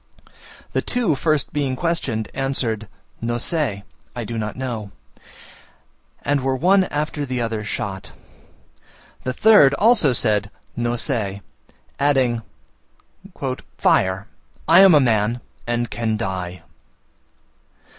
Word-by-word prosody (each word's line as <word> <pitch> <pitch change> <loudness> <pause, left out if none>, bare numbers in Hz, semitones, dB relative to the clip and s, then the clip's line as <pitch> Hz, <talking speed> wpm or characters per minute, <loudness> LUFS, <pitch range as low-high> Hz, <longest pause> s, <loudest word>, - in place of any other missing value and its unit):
The - - +1
two 245 -10 0
first 155 0 0
being 140 -3 0
questioned, 135 -10 -1
answered, 125 -5 -2 0.3
"No 120 +1 -1
se" 120 - -1 0.3
(I 120 - -3
do 115 +1 -5
not 110 -1 -3
know), 120 -6 -4 1.3
and 145 -1 +1
were 135 0 0
one 185 +7 +4
after 150 -1 -3
the 130 -2 -3
other 115 -2 -2
shot. 100 -2 -5 1.1
The 130 - -1
third 150 -8 +6
also 210 - +4
said 105 -4 +1 0.3
"No 120 0 -1
se;" 105 -6 -2 0.6
adding, 130 -5 +2 1.4
"Fire, 95 +2 +2 0.4
I 165 +3 +7
am 190 -4 +8
a - - +7
man, 115 -2 +1 0.3
and 120 0 0
can 110 -2 -1
die!" 90 -4 -4
120 Hz, 115 wpm, -21 LUFS, 110-145 Hz, 1.4 s, am